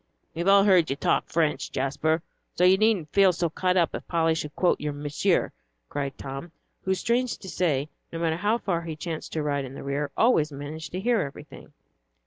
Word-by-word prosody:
"We've 170 +2 -3
all 195 0 +7
heard 185 -5 +4
you 135 - 0
talk - - +1
French, 160 -2 0
Jasper, 155 +4 0 0.3
so 180 - +1
you 185 +1 +7
needn't 200 -7 +1
feel 195 -2 +6
so 170 -2 -1
cut 185 +2 +1
up 170 -2 +2
if - - -6
Polly 165 -1 +2
should 150 -2 -5
quote 180 - +2
your 150 -1 -2
Monsieur," 150 +6 0 0.4
cried 140 -1 -3
Tom, 135 +5 -7 0.3
who, 190 0 +2
strange 235 +6 0
to 190 - -11
say, 155 -7 0 0.2
no 165 - -5
matter 165 -1 0
how 210 +5 +1
far 180 -7 -1
he 165 -2 -5
chanced 160 0 -5
to 155 - -1
ride 145 -1 0
in 135 0 -8
the - - -8
rear, 140 +1 -2
always 160 -11 +3
managed 145 +3 -7
to 185 - -2
hear 230 +1 +2
everything. 140 - -9
165 Hz, 205 wpm, -26 LUFS, 150-185 Hz, 0.4 s, all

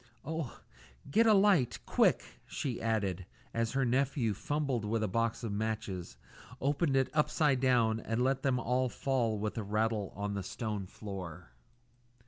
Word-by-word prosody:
"Oh! 160 -3 -4 0.5
get 230 +8 +5
a 220 - +7
light 195 - +4
quick!" - - +3 0.2
she 130 -5 -3
added, 100 -5 -1 0.3
as 115 0 0
her 135 -1 +2
nephew, 125 -2 +1
fumbling 130 -2 -1
with 110 0 0
a - - +1
box 115 +4 -1
of 115 - -2
matches, 100 -4 -3 0.4
opened 140 +1 +1
it 135 -1 +2
upside 150 -2 +2
down 120 -4 +3
and 115 +2 -1
let 135 +1 +1
them 130 -2 +1
all 125 +1 +1
fall 120 -5 0
with 105 +2 -2
a - - -3
rattle 105 0 0
on 100 0 -3
to - - -3
the - - -4
stone 105 -1 -4
floor. 90 - -8
115 Hz, 160 wpm, -32 LUFS, 105-135 Hz, 0.5 s, a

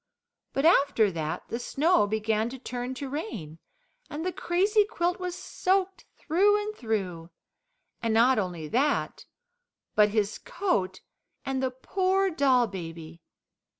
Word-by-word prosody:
But 275 - 0
after 280 - +4
that 160 -2 -4
the 235 - -3
snow 290 - +2
began 220 +1 0
to 265 - -8
turn 250 0 -5
to 275 +2 -5
rain, 220 - -6 0.5
and 310 +3 -5
the 370 - 0
crazy 395 +6 +2
quilt 355 -3 -1
was 360 -1 -4
soaked 380 +1 -1
through 390 +6 +3
and 425 +1 -4
through: 185 - -3 0.7
and 230 - 0
not 235 +2 +4
only 175 -5 -3
that, 280 - 0 0.7
but 210 -1 +5
his 210 0 -1
coat 190 - -1 0.4
and 265 -1 -1
the 260 - +1
poor 375 +9 0
doll 265 -5 +3
baby. 165 -4 -8
260 Hz, 135 wpm, -27 LUFS, -, 0.7 s, but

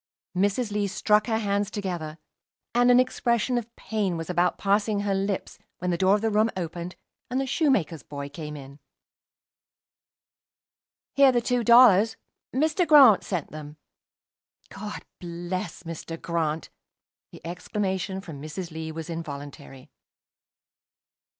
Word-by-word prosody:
Mrs. 205 +4 +1
Lee 205 -1 0
struck 210 +2 +2
her 220 -2 +1
hands 205 -2 0
together, 175 -7 -4 0.6
and 245 +1 +4
an 245 0 +7
expression 245 -1 +1
of 235 0 -11
pain 205 -6 -2
was 165 +2 -4
about 175 0 +1
passing 205 +1 +1
her 200 -1 0
lips, 195 0 -2 0.2
when 180 0 -2
the 170 - 0
door 190 +1 +4
of 210 - -2
the 225 0 0
room 215 +2 +3
opened, 175 0 -5 0.3
and 255 +1 -1
the 270 - 0
shoemaker's 245 - +1
boy 140 -1 -7
came 150 +1 -7
in. 140 +1 -12 2.3
"Here 270 -3 +5
are - - +5
two 245 +1 0
dollars. 225 -2 +6 0.3
Mr. 310 +6 +1
Grant 275 -9 +8
sent 180 -6 -4
them." 150 0 -9 0.9
"God 210 +1 -7
bless 175 0 -5
Mr. 165 0 -7
Grant!" 165 -2 -2 0.6
The - - -14
exclamation 190 +2 -3
from 160 -7 -9
Mrs. 165 +3 -6
Lee 160 0 -5
was 160 0 -6
involuntary. 145 -5 -8
190 Hz, 135 wpm, -26 LUFS, 165-220 Hz, 2.3 s, Grant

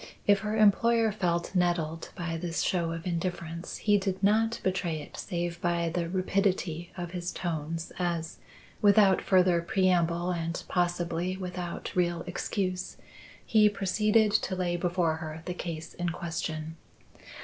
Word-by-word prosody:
If 205 -1 +5
her 215 +2 -2
employer 225 +2 +4
felt 175 -4 -1
nettled 170 -3 0
by 170 -2 -3
this 165 0 -2
show 170 -3 0
of 165 0 -5
indifference, 170 -1 -3
he 205 -1 +3
did 190 0 -3
not 225 +3 +3
betray 180 -4 0
it 150 - -10
save 175 0 -3
by 170 -1 +1
the 170 0 -2
rapidity 185 -2 0
of 175 -1 -4
his 180 -1 -3
tones 165 -1 -3
as, 170 -2 -2 0.4
without 200 -2 +5
further 180 -2 +4
preamble 175 -1 +2
and 170 -1 -3
possibly 175 0 0
without 180 -2 -5
real 175 -2 +1
excuse, 185 0 -3 0.5
he 215 -2 +5
proceeded 210 +2 +2
to 185 - +1
lay 180 -1 0
before 175 -2 0
her 160 0 -7
the 180 - -3
case 165 -2 -6
in 175 0 -2
question. 160 -1 -4
175 Hz, 140 wpm, -29 LUFS, 170-190 Hz, 0.5 s, If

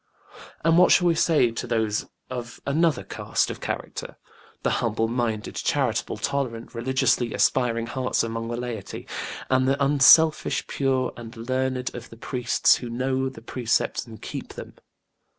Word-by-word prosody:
And 165 +1 +5
what 180 - +6
shall 180 - +5
we 170 - +4
say 155 -7 +3
to 115 - -5
those 110 -3 0 0.2
of 120 -2 -6
another 155 -1 +1
caste - - -1
of - - -9
character - - -5 0.5
the - - +1
humble 115 -1 0
minded, 115 -2 -2
charitable, - - -1
tolerant, 120 -5 -3
religiously 120 -1 +1
aspiring 115 -3 +2
hearts 130 +1 -1
among 115 0 -3
the 120 0 -3
laity, 120 -5 -6 0.4
and 130 0 +2
the 135 +1 +1
unselfish, 150 +3 +5
pure 130 -2 0
and 115 0 -10
learned 130 +2 -2
of 120 0 -8
the 115 - -13
priests 125 0 +2
who 120 - -7
know 130 +2 -1
the 115 -4 -13
Precepts 120 0 -1
and 110 -1 -12
keep - - -6
them? - - -9
125 Hz, 150 wpm, -25 LUFS, 115-130 Hz, 0.5 s, what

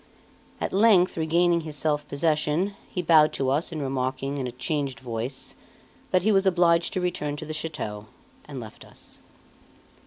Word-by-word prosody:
At - - -3
length 195 -3 +4
regaining 170 +1 +2
his 155 -2 -6
self 150 0 0
possession, 155 +5 0 0.2
he 180 - -3
bowed 155 -2 +6
to 135 -1 0
us, 150 +6 0
and 160 - -4
remarking, 135 +1 -2
in 130 - -2
a - - -5
changed 135 0 -3
voice, 125 +2 -5 0.6
that 180 -1 +2
he 220 - +3
was 195 -1 +3
obliged 170 -2 +3
to 185 - -1
return 150 -5 -2
to 150 - -7
the 155 - -5
chateau, 110 -10 -5 0.4
left 125 -6 -8
us. - - -15
155 Hz, 160 wpm, -25 LUFS, 135-170 Hz, 0.6 s, bowed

